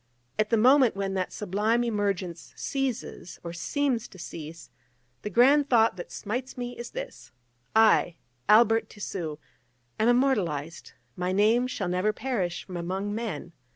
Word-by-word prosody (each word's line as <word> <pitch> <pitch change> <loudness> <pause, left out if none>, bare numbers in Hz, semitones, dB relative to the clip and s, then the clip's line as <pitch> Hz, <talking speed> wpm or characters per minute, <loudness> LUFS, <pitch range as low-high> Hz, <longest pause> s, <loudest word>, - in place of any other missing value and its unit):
At 215 0 +2
the 230 - +3
moment 255 +1 +5
when 195 -1 -2
that 185 -1 -2
sublime 210 +4 0
emergence 200 -6 -2
ceases, 260 -10 -4
or 170 -1 -6
seems 245 - -1
to 190 - -15
cease, 165 -1 -9 0.5
the - - -4
grand 280 +5 +5
thought 225 -4 +4
that 175 - -8
smites 250 +6 -4
me 245 0 -4
is 240 - -7
this: - - -8 0.4
"I, 220 -6 +5 0.3
Albert 225 +1 +5
Tissu, 175 -7 -5 0.6
am 220 - +3
immortalised: 185 - 0 0.2
my 180 +1 -1
name 220 +6 +3
shall 205 -7 -3
never 185 +4 +1
perish 210 -8 -2
from 180 -2 -6
among 190 +4 -3
men!" 220 -5 -4
210 Hz, 145 wpm, -27 LUFS, 180-240 Hz, 0.6 s, moment